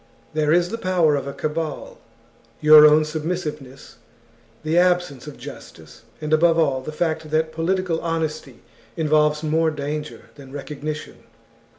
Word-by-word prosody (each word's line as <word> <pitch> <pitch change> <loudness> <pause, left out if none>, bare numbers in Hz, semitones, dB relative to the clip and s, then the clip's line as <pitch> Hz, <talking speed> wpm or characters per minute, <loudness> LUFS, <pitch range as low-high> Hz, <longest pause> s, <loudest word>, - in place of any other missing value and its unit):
There 155 -1 +1
is 175 +1 +3
the 230 - -5
power 175 -6 +2
of 140 -1 -3
a - - -3
cabal, 155 +1 -5 0.6
your 150 0 +9
own 155 +1 +4
submissiveness, 155 -4 -5 0.7
the 155 +1 -1
absence 175 -6 +1
of 150 - -9
justice, 80 +3 -12 0.2
and, 155 0 -3
above 165 +1 +4
all, 140 -5 +1
the 140 - -7
fact 160 0 -2
that 160 +1 0
political 170 0 -1
honesty 155 -6 -4 0.4
involves 150 -1 +2
more 160 +1 +1
danger 150 0 -6
than 135 -2 -14
recognition. 150 +2 -6
155 Hz, 135 wpm, -22 LUFS, 150-165 Hz, 0.7 s, your